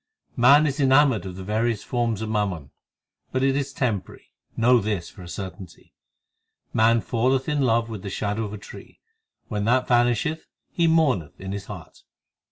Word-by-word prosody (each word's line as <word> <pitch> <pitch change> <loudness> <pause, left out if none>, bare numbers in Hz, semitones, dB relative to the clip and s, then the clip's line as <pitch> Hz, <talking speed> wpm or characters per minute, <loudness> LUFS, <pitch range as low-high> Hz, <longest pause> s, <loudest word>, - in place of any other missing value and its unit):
3 120 - -6
Man 140 +5 +7
is 145 0 -2
enamoured 135 -7 +4
of 90 - -7
the 95 - -7
various 110 +2 -1
forms 115 -3 -1
of 110 - -4
mammon, 95 -10 -2 0.6
But 130 0 0
it 135 0 +2
is 140 0 -2
temporary; 110 -8 -3 0.3
know 120 +2 +5
this 100 -5 -3
for 95 - -14
a 90 - -10
certainty. 95 -2 -9 0.8
Man 115 +1 +4
falleth 130 +4 0
in 150 -1 0
love 115 -3 +2
with 110 -4 -7
the 100 - -6
shadow 105 +3 -2
of 105 - -7
a - - -5
tree: 100 - -13 0.5
When 105 -2 -2
that 125 +2 +2
vanisheth 120 +6 +1 0.2
he 170 -1 +1
mourneth 145 - +1
in 95 0 -6
his 100 0 -5
heart. 90 -7 -10
115 Hz, 175 wpm, -24 LUFS, 100-130 Hz, 0.8 s, Man